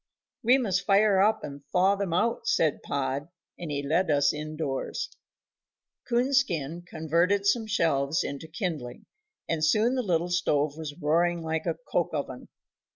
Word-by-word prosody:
"We 250 +2 +5
must 190 -8 -1
fire 200 -1 +4
up, 215 +2 +2
and 140 0 -7
thaw 190 +2 +4
them 200 -3 -3
out," 230 +6 0
said 155 -3 +2
Pod, 140 +1 -2 0.3
and 170 - -5
he 140 -1 -2
led 165 +5 +1
us 140 -1 +3
in 155 +1 -6
doors. 140 -4 -3 1.0
Coonskin 235 - +1
converted 170 +6 +1
some 220 +2 +2
shelves 160 -6 +1
into 140 +3 -6
kindling, 160 - -5 0.4
and 160 -2 -1
soon 215 +10 +3
the 260 - 0
little 175 -5 0
stove 150 -4 +1
was 150 -2 -7
roaring 170 +2 +1
like 160 +1 -2
a 165 - 0
coke 170 -2 0
oven. 130 -3 -5
165 Hz, 155 wpm, -27 LUFS, 150-200 Hz, 1.0 s, We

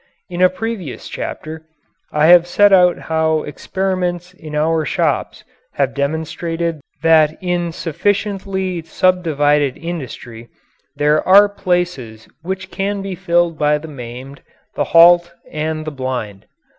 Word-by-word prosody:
In 175 0 -3
a 185 - +6
previous 190 - -6
chapter 155 +1 -6 0.5
I 150 0 +2
have 175 +1 +7
set 205 +3 +4
out 180 -2 +5
how 160 -1 0
experiments 180 +2 -3
in 155 -4 -9
our 160 +1 +1
shops 145 - -1 0.3
have 135 -2 0
demonstrated 160 +3 -3 0.2
that 160 -1 +4
in 175 -2 -2
sufficiently 190 +1 -2
subdivided 150 -5 +1
industry 125 -8 -7 0.5
there 150 +1 +2
are 200 +2 +7
places 175 - -3
which 190 +3 -5
can 200 0 -3
be 195 -1 -4
filled 170 -2 0
by 150 0 +2
the 155 +2 -9
maimed, 130 0 -9 0.3
the - - -1
halt, 170 +1 +6 0.2
and 155 0 -3
the 155 - -4
blind. 125 -7 -5
165 Hz, 125 wpm, -18 LUFS, 150-180 Hz, 0.5 s, have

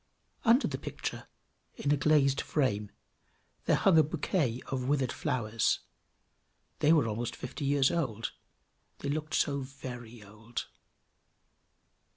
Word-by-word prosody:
Under 235 +5 +5
the - - -4
picture, - - -5 0.5
in 145 - -1
a - - +6
glazed 140 -1 +3
frame, 105 -8 0 0.8
there - - +4
hung 180 -5 +5
a - - +7
bouquet 145 -4 0
of 130 -1 -3
withered 135 -3 +1
flowers; 115 -3 0 1.0
they 150 - +4
were 155 -8 +5
almost 115 +2 -3
fifty 125 +3 -5
years 140 -1 +3
old; 120 -10 -1 0.7
they 140 - -2
looked 155 +1 -2
so 140 -1 +2
very 125 -4 -8
old! 105 +4 -6
135 Hz, 125 wpm, -31 LUFS, 120-150 Hz, 1.0 s, a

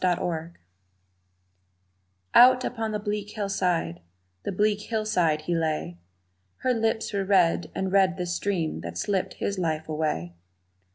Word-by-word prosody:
Love 180 -2 +3
Unkind 165 0 -4 1.8
OUT 255 +1 +7
upon 225 -2 -2
the 210 - -1
bleak 205 0 -3
hillside, 180 - -1 0.4
the - - -3
bleak 210 +2 +1
hillside, 210 -9 0
he 175 - -1
lay 155 - -1 0.6
Her 255 - +2
lips 225 -1 -1
were 200 -1 0
red, 185 -3 +3
and 190 -1 -1
red 190 -2 +3
the 180 - -2
stream 175 - -1
that 85 0 -6
slipped 195 - -1
his 200 -1 -2
life 160 -3 -1
away. 150 - -2
185 Hz, 135 wpm, -26 LUFS, 160-210 Hz, 1.8 s, OUT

